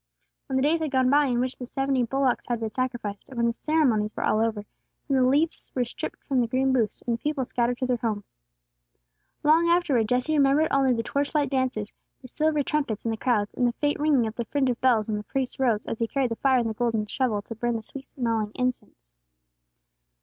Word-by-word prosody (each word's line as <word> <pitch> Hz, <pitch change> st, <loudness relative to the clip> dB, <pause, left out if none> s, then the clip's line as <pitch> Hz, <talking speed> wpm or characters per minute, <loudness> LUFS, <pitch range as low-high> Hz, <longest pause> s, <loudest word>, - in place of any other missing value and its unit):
When 265 Hz, -, -3 dB
the 265 Hz, -, +2 dB
days 315 Hz, +3 st, +3 dB
had 315 Hz, -1 st, -2 dB
gone 260 Hz, -1 st, +2 dB
by 290 Hz, +1 st, +5 dB
in 245 Hz, -2 st, 0 dB
which 255 Hz, +1 st, -2 dB
the 250 Hz, -, -7 dB
seventy 270 Hz, 0 st, 0 dB
bullocks 265 Hz, +1 st, 0 dB
had 240 Hz, -2 st, -1 dB
been 220 Hz, -1 st, -3 dB
sacrificed, 240 Hz, -5 st, -3 dB
and 260 Hz, -, -10 dB
when 235 Hz, -, +2 dB
the 235 Hz, -, +1 dB
ceremonies 235 Hz, -8 st, +1 dB
were -, -, -3 dB
all 215 Hz, -, +2 dB
over, 220 Hz, -2 st, -1 dB, 0.4 s
then 275 Hz, -, +1 dB
the 255 Hz, -, +4 dB
leaves 305 Hz, +5 st, +1 dB
were 250 Hz, -1 st, +1 dB
stripped 240 Hz, -, -7 dB
from 265 Hz, -3 st, +1 dB
the 235 Hz, -, 0 dB
green 260 Hz, +3 st, +1 dB
booths, 225 Hz, -5 st, 0 dB
and 240 Hz, -2 st, 0 dB
the 230 Hz, -, -10 dB
people 295 Hz, -3 st, -1 dB
scattered 240 Hz, 0 st, 0 dB
to 255 Hz, -, -1 dB
their 250 Hz, -1 st, +1 dB
homes. 215 Hz, -, -4 dB, 1.0 s
Long 320 Hz, +3 st, +4 dB
afterward, 290 Hz, -11 st, +2 dB
Jesse 250 Hz, +5 st, +1 dB
remembered 285 Hz, +2 st, +3 dB
only 270 Hz, -1 st, +3 dB
the 230 Hz, -2 st, 0 dB
torch 280 Hz, +6 st, -2 dB
light 290 Hz, -3 st, +1 dB
dances, 255 Hz, -6 st, -1 dB, 0.3 s
the 255 Hz, -, -12 dB
silver 300 Hz, +2 st, 0 dB
trumpets 275 Hz, -8 st, -2 dB
and 225 Hz, -, 0 dB
the -, -, -4 dB
crowds, 210 Hz, -4 st, 0 dB
and 245 Hz, -, +1 dB
the 240 Hz, -, 0 dB
faint 290 Hz, +3 st, -1 dB
ringing 290 Hz, -5 st, +3 dB
of 220 Hz, -, -3 dB
the 235 Hz, 0 st, -4 dB
fringe 265 Hz, +1 st, +1 dB
of 245 Hz, -, -6 dB
bells 235 Hz, -5 st, +3 dB
on 215 Hz, -1 st, -1 dB
the 210 Hz, -, -5 dB
priest's 265 Hz, +4 st, -3 dB
robes 235 Hz, -5 st, +1 dB
as 225 Hz, -, -4 dB
he 230 Hz, -, 0 dB
carried 260 Hz, -1 st, -1 dB
the -, -, -1 dB
fire 265 Hz, -2 st, +3 dB
on 235 Hz, -2 st, +1 dB
the 220 Hz, -, -2 dB
golden 225 Hz, -1 st, 0 dB
shovel 215 Hz, -3 st, -1 dB
to 230 Hz, -, -7 dB
burn 240 Hz, +1 st, -1 dB
the 225 Hz, -, -4 dB
sweet 270 Hz, +4 st, -8 dB
smelling 225 Hz, -4 st, -2 dB
incense. 250 Hz, -, -4 dB
250 Hz, 235 wpm, -26 LUFS, 230-275 Hz, 1.0 s, by